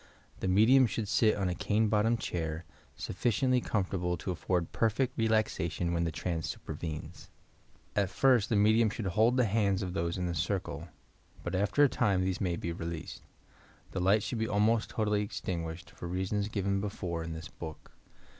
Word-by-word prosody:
The - - -2
medium 115 +8 +6
should 110 -1 -3
sit 110 +1 +3
on 100 -2 -1
a 90 - 0
cane 110 +4 +1
bottomed 110 +2 +2
chair, 80 -4 -3 0.3
BufBciently 125 +5 +1
comfortable 90 -4 -1
to 95 - -4
afford 90 0 -1
perfect 120 +3 +1
relaxation 110 -6 0
when 85 0 +1
the 85 - -1
trance 85 0 -3
supervenes. 80 -3 -6 0.7
At 100 -2 +2
first 120 +2 +3
the 115 - +2
medium 110 +2 +4
should 105 +1 -5
hold 110 +7 +3
the 125 - +4
hands 100 -2 +1
of 90 -1 -4
those 85 -2 -1
in 90 - -1
the 85 - -1
circle, 85 -2 -2 0.6
but - - -4
after 100 +10 +3
a - - +7
time 100 -8 +1
these 95 0 -1
may 90 -3 0
be 85 0 -3
released. 85 -1 -6 0.7
The 95 - -3
light 100 +4 +3
should 120 - -3
be 110 - 0
almost 105 +2 +2
totally 105 -2 +1
ex 105 - -4
tinguished, 85 -2 -4
for 85 - -8
reasons 95 +3 -1
given 100 -2 -1
before 90 -5 -3
in 80 0 -5
this 80 +1 -7
book. 80 -2 -9
100 Hz, 180 wpm, -31 LUFS, 85-110 Hz, 0.7 s, a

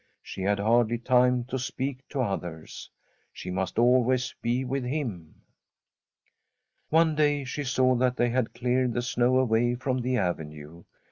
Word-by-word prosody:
She - - -8
had 100 +2 +1
hardly 115 +3 +2
time 125 +1 +3
to 130 +2 -4
speak 130 +1 -4
to 140 - -2
others. 90 -8 -5 0.4
She 90 - -7
must 95 +2 -3
always 125 +1 +3
be 120 +3 0
with 135 +1 -2
him. 125 - -5 1.5
One 160 0 +3
day 145 -2 +1
she 140 +3 -4
saw 130 0 +2
that 125 0 +1
they 120 - +2
had 125 -1 -1
cleared 125 0 0
the 120 - -1
snow 125 +1 +2
away 120 -1 +2
from 130 +1 -2
the 125 +1 0
avenue. 80 -3 -4
125 Hz, 150 wpm, -27 LUFS, 110-130 Hz, 1.5 s, time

